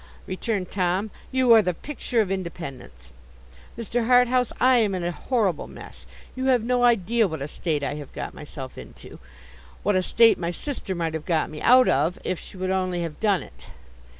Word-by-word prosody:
returned 190 0 -3
Tom. 190 +2 0 0.2
'You 255 -2 +5
are 225 - +8
the 180 -4 -1
picture 250 - -2
of 195 -3 -2
independence. 165 - -7 0.7
Mr. 230 0 -2
Harthouse, 250 0 +4
I 255 0 +5
am 210 -5 +2
in 180 - -3
a 175 - -1
horrible 200 - -1
mess. - - -12 0.3
You 260 0 -3
have 255 -4 +3
no 245 +1 +1
idea 230 -1 +3
what 160 -4 -5
a - - -4
state 150 -1 -2
I 140 - -1
have 145 -2 -8
got - - -6
myself 135 -3 -9
into—what 60 - -8
a 185 - +3
state 225 +4 +4
my 170 -1 -2
sister 195 0 -4
might 165 -2 -2
have 160 -1 -5
got 160 -3 0
me 150 - -8
out 255 +1 +6
of, 155 +6 +1
if 185 - -2
she 195 - -11
would 185 0 -2
only 185 -2 -1
have 165 -3 -6
done 205 -4 +2
it. - - -16
190 Hz, 190 wpm, -24 LUFS, 165-235 Hz, 0.7 s, are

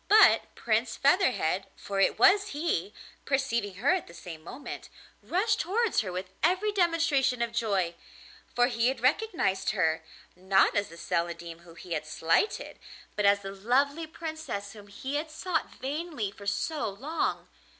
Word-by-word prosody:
But 430 +1 +6
Prince 225 +1 0
Featherhead, 255 - +2
for 200 -1 -4
it 195 - +3
was 400 +1 +5
he, 210 - -1 0.3
perceiving 235 -7 0
her 240 - +2
at 370 - -2
the 170 - -13
same 165 -1 -9
moment, 265 - -8 0.3
rushed 415 +4 +1
towards 430 +5 +1
her 190 -4 -2
with 185 +1 -5
every 370 +7 +2
demonstration 330 -9 +2
of 235 - -3
joy: 200 -7 0 0.6
for 245 - +5
he 240 -2 +1
had 260 -1 0
recognised 255 - +1
her, 160 -3 +1 0.3
not 190 +2 +3
as 205 -1 +1
the 165 - -12
Celandine 170 0 -3
whom 170 -1 -16
he 175 0 -7
had 155 -1 -3
slighted, 165 - 0 0.4
but 210 -1 +2
as 200 0 +4
the 195 0 -6
lovely 275 +10 +1
Princess 315 -11 -6
whom 205 -2 -13
he 265 +8 -4
had 310 +2 -3
sought 320 +1 -2
vainly 285 - -4
for 200 0 -11
so 300 +3 -1
long. 275 +12 -2
235 Hz, 160 wpm, -29 LUFS, 195-320 Hz, 0.6 s, But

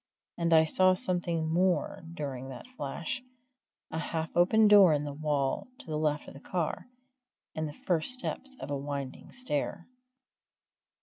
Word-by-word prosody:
And 170 -1 -1
I 160 -1 +6
saw 185 +3 +4
something 175 -6 0
more 185 +1 +1
during 135 -5 -5
that 130 - -9
flash 165 - -4 0.7
a 160 - -3
half 160 -1 -4
open 210 +5 +5
door 200 -5 +8
in 145 -1 0
the 145 -1 -5
wall 145 -2 -1
to - - -13
the 155 - -4
left 150 -1 -1
of - - -10
the 135 - -11
car, 170 - -3 0.7
and 155 0 -2
the 150 - -11
first 170 +3 +4
steps 265 +1 -1
of - - -6
a - - 0
winding 140 -1 -5
stair. 180 - -2
160 Hz, 160 wpm, -30 LUFS, 145-185 Hz, 0.7 s, door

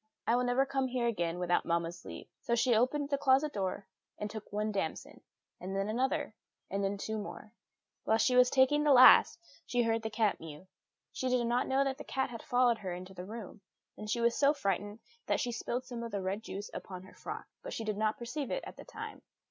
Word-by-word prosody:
I 235 - +3
will 250 - +2
never 245 +2 +3
come 270 -1 0
here 250 -1 -1
again 175 -7 -1
without 175 0 +1
mamma's 170 +1 -2
leave." - - -8
So 235 - 0
she 240 +1 +3
opened 270 +6 +2
the 280 - +1
closet 275 +2 +3
door 195 0 -2 0.3
and 210 0 -4
took 220 -2 -8
one 210 +1 -1
damson, 195 -6 -4 0.4
and 190 +2 -5
then 195 +1 -1
another, 265 +4 0 0.4
and 200 +1 -1
then 195 +1 -1
two 220 +2 -3
more. 210 +1 -8 0.5
Whilst 220 0 +3
she 250 - +3
was 250 0 +6
taking 275 +3 +4
the 295 -2 +5
last, 255 0 +8 0.3
she 245 -1 +2
heard 225 0 +1
the 220 - -3
cat 215 -2 +1
mew. 160 +1 -10 0.5
She 260 - -2
did 250 -1 +2
not 240 +2 +1
know 270 +1 +3
that 270 -1 -2
the - - -6
cat 265 -1 -2
had 230 - -7
followed 245 -2 +2
her 190 -3 -4
into 185 +1 -9
the 180 -1 -7
room; 215 -1 -8 0.3
and 210 - -8
she 235 +2 0
was 235 0 +3
so 285 +1 +4
frightened 205 -3 -2 0.3
that - - +1
she 245 - -1
spilled 240 +2 -3
some 240 -2 -6
of 235 - -4
the 200 -3 -3
red 195 +3 -2
juice 205 -1 -7
upon 185 -1 -7
her 190 - -15
frock, - - -7 0.2
but - - -7
she 225 - -4
did 215 -1 -2
not 215 +1 0
perceive 260 +3 -4
it - - -2
at - - -10
the - - -10
time. - - -8
230 Hz, 230 wpm, -32 LUFS, 200-255 Hz, 0.5 s, last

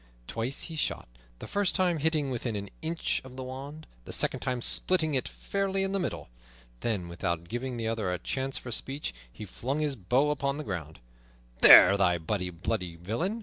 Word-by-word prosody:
Twice 115 - -2
he 165 - -5
shot, 155 - -1 0.3
the - - -8
first 200 -2 0
time 180 -4 +2
hitting 150 -2 +1
within 120 -2 -3
an 100 -1 -5
inch 165 +1 -1
of 130 -1 -12
the 130 - -4
wand, 140 +4 -8 0.2
the - - -7
second - - +1
time 125 -2 -2
splitting 160 +5 +2
it 130 - 0
fairly 195 -1 -2
in 195 - -1
the 195 - 0
middle. 85 - -3 0.5
Then, 105 -7 -2
without 85 0 -3
giving 120 +4 -4
the 115 -1 -2
other 110 -5 -1
a 90 - -1
chance 135 +7 -3
for 120 - -7
speech, 135 - -3 0.2
he 105 - -8
flung 130 +9 -3
his 150 -3 0
bow 130 +8 +2
upon 140 -1 -1
the 150 - -4
ground. 80 - -6 0.6
"There, 100 - +10
thou 90 -3 +3
bloody 90 +2 -2 0.5
villain!" 115 - -2
130 Hz, 190 wpm, -29 LUFS, 100-155 Hz, 0.6 s, There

